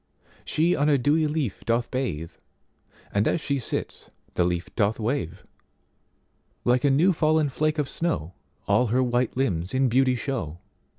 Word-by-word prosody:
She 170 +3 +1
on 145 +2 +2
a 145 - +4
dewy 150 +5 +2
leaf 150 -9 -2
doth 115 +1 0
bathe, 100 - -3 0.8
And 100 +1 +2
as - - +1
she 140 -2 -1
sits 120 - -5 0.2
the - - +2
leaf 85 0 -2
doth 110 0 +1
wave:Like 120 - -5
a 145 - +4
new 160 +8 +4
fallen 155 -2 +2
flake 155 +3 0
of 150 - +1
snowAll 105 - -2
her 130 +3 +2
white 125 0 0
limbs 95 -7 -1
in 130 -1 +3
beauty 130 +1 +3
show. 120 - -3
130 Hz, 150 wpm, -25 LUFS, 110-145 Hz, 0.8 s, a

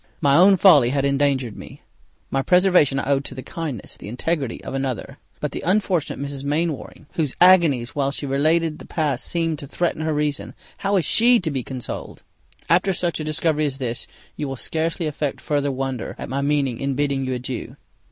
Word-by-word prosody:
My 140 -4 +3
own 190 +4 +6
folly 150 -11 +6
had 140 +1 0
endangered 140 -4 +1
me, - - -12 0.5
my 135 - +1
preservation 180 -4 +4
I 140 0 -1
owe 140 - +3
to 135 -1 -8
the 130 - -7
kindness, 150 - -5
the - - -10
integrity 135 +3 -2
of - - -6
another; 135 -5 -4 0.2
but - - -3
the - - -5
unfortunate 185 -3 0
Mrs. 140 -1 -4
Mainwaring, 150 +1 -3
whose 150 -5 -1
agonies 165 -9 +5
while 140 -2 0
she 140 +1 -4
related 155 +3 +1
the - - -11
past 145 -6 -1
seemed 165 -3 0
to 140 - -8
threaten 170 +2 -2
her 160 0 -1
reason, 150 0 -2 0.2
how 200 +1 0
is 175 - +1
she 240 - +6
to 160 -3 -2
be 135 -2 -2
consoled! 125 0 -6 0.4
After 180 +3 +3
such 175 -2 0
a - - -3
discovery 155 0 +1
as 135 -2 -3
this, 120 -3 -3 0.3
you 150 - -4
will 135 - -4
scarcely 160 +5 -1
affect 150 -2 -3
further 145 -1 -1
wonder 130 -2 -4
at - - -7
my 135 +2 -2
meaning 140 -4 0
in 135 -1 -2
bidding 140 -1 0
you 130 0 -2
adieu. 125 0 -5
145 Hz, 195 wpm, -22 LUFS, 135-165 Hz, 0.5 s, own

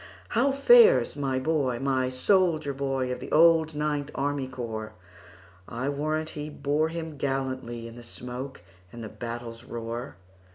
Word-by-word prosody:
"How 250 +5 +2
fares 465 - +6
my 135 -2 -1
boy,—my 130 -3 0
soldier 155 +1 +2
boy, 135 -2 -1
Of 125 - -3
the - - -8
old 160 -1 +5
Ninth 150 -1 -1
Army 140 -1 -1
Corps?I 110 -2 -8
warrant 155 +2 -1
he 150 0 -6
bore 150 +2 0
him 160 -3 -6
gallantlyIn 130 -4 -3
the - - -9
smoke 125 +1 -7 0.3
and 120 -1 -8
the 110 - -6
battle's 115 0 -7
roar!" 115 -1 -6
135 Hz, 130 wpm, -27 LUFS, 120-155 Hz, 0.3 s, fares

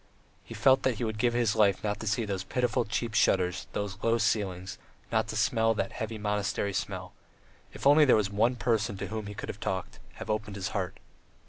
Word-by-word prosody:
He - - -10
felt 135 -1 +4
that 130 -3 +1
he 110 - -4
would 110 -1 -3
give 120 +1 +2
his 120 -3 +2
life 100 -3 +3
not 105 -1 -1
to 110 - -5
see 110 +2 +1
those 95 -2 -3
pitiful 120 +3 0
cheap 110 +2 -2
shutters, 90 -3 +2
those 100 -1 -3
low 115 0 +2
ceilings, 95 -4 -1 0.3
not - - +1
to - - -5
smell 115 0 +2
that 100 -2 -2
heavy 110 0 -4
monastery 105 -1 -1
smell. - - -4 0.6
If - - -9
only 145 +2 +7
there 140 - +6
were 105 - +3
one 105 +5 +1
person 110 -3 0
to - - -5
whom 110 -1 -4
he 105 - -7
could - - -6
have 100 - -6
talked, 95 -3 -4
have - - -8
opened 105 -1 -3
his 95 -2 -3
heart! 95 -2 -3
105 Hz, 215 wpm, -29 LUFS, 100-115 Hz, 0.6 s, only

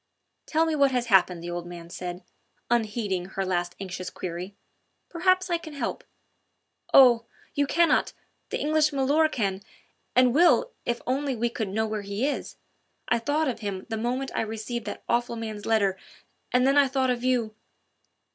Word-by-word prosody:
"Tell 320 +1 +2
me 320 - 0
what 280 -2 +4
has 250 -2 0
happened," 180 -2 +4
the 175 - -5
old 175 0 -5
man 170 -1 -9
said, 180 +1 -6 0.5
unheeding 210 -5 0
her 190 +1 -3
last 175 -1 -1
anxious 185 -2 -5
query. 180 +2 -6 0.5
"Perhaps 370 +2 +2
I 340 - +1
can 315 -2 -10
help 280 - -3 0.5
..." - - -51
"Oh! 240 -4 +7 0.3
you 285 0 +1
cannot 340 +4 +3 0.4
the - - -2
English 305 0 +2
milor' 285 +3 +3
can 200 -8 -2 0.5
and 250 -1 +5
will 350 - +4 0.2
if 240 0 -1
only 270 +1 -1
we 235 +1 -1
could 220 -4 -3
know 220 +3 0
where 215 -1 -3
he 200 +5 -2
is. 290 - -3 0.5
I - - +3
thought 295 +6 0
of 245 -3 -2
him 200 -3 -4
the 225 - -2
moment 250 +4 -2
I - - 0
received 225 +2 -4
that 205 - -6
awful 235 0 0
man's 220 -2 -6
letter 200 -4 +2 0.5
and 250 0 +3
then 275 +2 +3
I 280 - +5
thought 260 -1 +1
of 245 -1 -3
you...." 245 -4 +1
235 Hz, 175 wpm, -26 LUFS, 200-275 Hz, 0.5 s, Oh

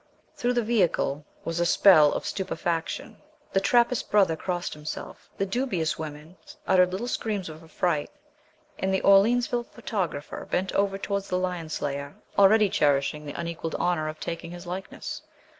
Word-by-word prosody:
Through 245 +1 0
the 240 -1 +1
vehicle 180 -9 +1 0.2
was 165 +1 -2
a 175 - +2
spell 155 -6 +7
of - - -3
stupefaction. 185 +2 -3 0.3
The 195 - +4
Trappist 240 +4 +2
brother 195 -6 +4
crossed 175 +1 -3
himself, 150 0 -7
the 195 - 0
dubious 190 -8 -1
women 155 +3 -8 0.3
uttered 180 -1 +4
little 200 +6 -3
screams 210 -7 -2
of 155 +1 -10
affright, 160 -2 -1 0.7
and 190 - 0
the 190 - +1
Orleansville 240 +5 +4
photographer 170 -9 -4
bent 190 +1 0
over 195 -1 +1
towards 200 0 -3
the 180 - 0
lion 180 -3 -2
slayer, 140 -1 -4 0.2
already 210 +2 +6
cherishing 145 -2 +1
the 145 - -6
unequalled 170 -1 -4
honour 170 -3 0
of 155 0 -6
taking 170 0 -5
his 175 +1 -9
likeness. 185 +2 -6
180 Hz, 155 wpm, -26 LUFS, 160-200 Hz, 0.7 s, spell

